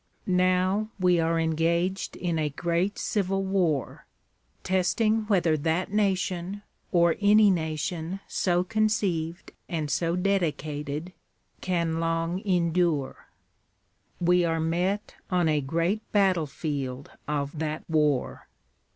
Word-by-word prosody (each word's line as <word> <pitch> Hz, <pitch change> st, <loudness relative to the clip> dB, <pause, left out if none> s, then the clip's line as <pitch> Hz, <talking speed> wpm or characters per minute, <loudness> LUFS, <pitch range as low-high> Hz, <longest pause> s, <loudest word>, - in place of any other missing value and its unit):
Now 185 Hz, +3 st, +2 dB
we 180 Hz, -2 st, +3 dB
are 165 Hz, 0 st, +1 dB
engaged 170 Hz, +4 st, 0 dB
in 170 Hz, -3 st, -2 dB
a 150 Hz, -1 st, 0 dB
great 170 Hz, +6 st, -1 dB
civil 195 Hz, -2 st, -1 dB
war.. 180 Hz, -8 st, -1 dB, 0.6 s
.testing 215 Hz, +4 st, +1 dB
whether 175 Hz, -6 st, +3 dB
that 160 Hz, +5 st, -1 dB
nation, 195 Hz, -1 st, -1 dB, 0.3 s
or 170 Hz, -2 st, +3 dB
any 205 Hz, 0 st, +6 dB
nation 160 Hz, +2 st, -2 dB
so 175 Hz, -1 st, +1 dB
conceived 190 Hz, -5 st, -1 dB, 0.2 s
and 155 Hz, -4 st, -2 dB
so 165 Hz, +4 st, 0 dB
dedicated... 160 Hz, -4 st, -2 dB, 0.5 s
can 170 Hz, -3 st, 0 dB
long 165 Hz, +2 st, -1 dB
endure. 170 Hz, -6 st, 0 dB, 0.9 s
We 180 Hz, 0 st, +3 dB
are 165 Hz, -1 st, 0 dB
met 180 Hz, +6 st, -1 dB, 0.2 s
on 180 Hz, -3 st, +2 dB
a 150 Hz, -2 st, +2 dB
great 170 Hz, +9 st, 0 dB
battlefield 150 Hz, -8 st, -1 dB, 0.2 s
of 145 Hz, +1 st, -2 dB
that 155 Hz, 0 st, -3 dB
war. 150 Hz, -5 st, 0 dB
170 Hz, 110 wpm, -27 LUFS, 160-190 Hz, 0.9 s, any